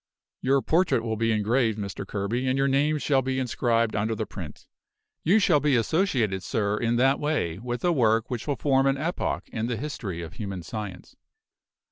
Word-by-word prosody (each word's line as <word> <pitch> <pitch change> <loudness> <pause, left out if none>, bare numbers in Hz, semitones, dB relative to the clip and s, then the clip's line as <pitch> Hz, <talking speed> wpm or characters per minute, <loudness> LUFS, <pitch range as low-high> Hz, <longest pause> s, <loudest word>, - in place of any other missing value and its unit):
Your 135 +1 +2
portrait 165 -8 +2
will 110 -1 -2
be 115 +1 +1
engraved, 110 +1 +1
Mr. 100 -1 -5
Kerby, 105 +6 -2
and 130 +1 +1
your 135 0 +2
name 145 +3 +2
shall 140 -2 +2
be 130 0 -2
inscribed 115 -3 +1
under 110 +2 0
the - - -2
print. - - -9 0.6
You 190 +7 +4
shall 180 -8 +4
be 145 -2 +2
associated, 120 - +1
sir, 100 +4 -1
in 115 +1 0
that 135 +3 +3
way, 145 - -1
with 120 +3 -4
a 175 - +4
work 115 -6 +2
which 120 0 -5
will 145 - +1
form 135 +1 +2
an 135 0 +2
epoch 165 +5 -2
in 110 0 -3
the 120 -2 -2
history 105 - -5
of 85 +1 -8
human 95 -3 -5
science. 105 0 -7
120 Hz, 190 wpm, -26 LUFS, 110-135 Hz, 0.6 s, You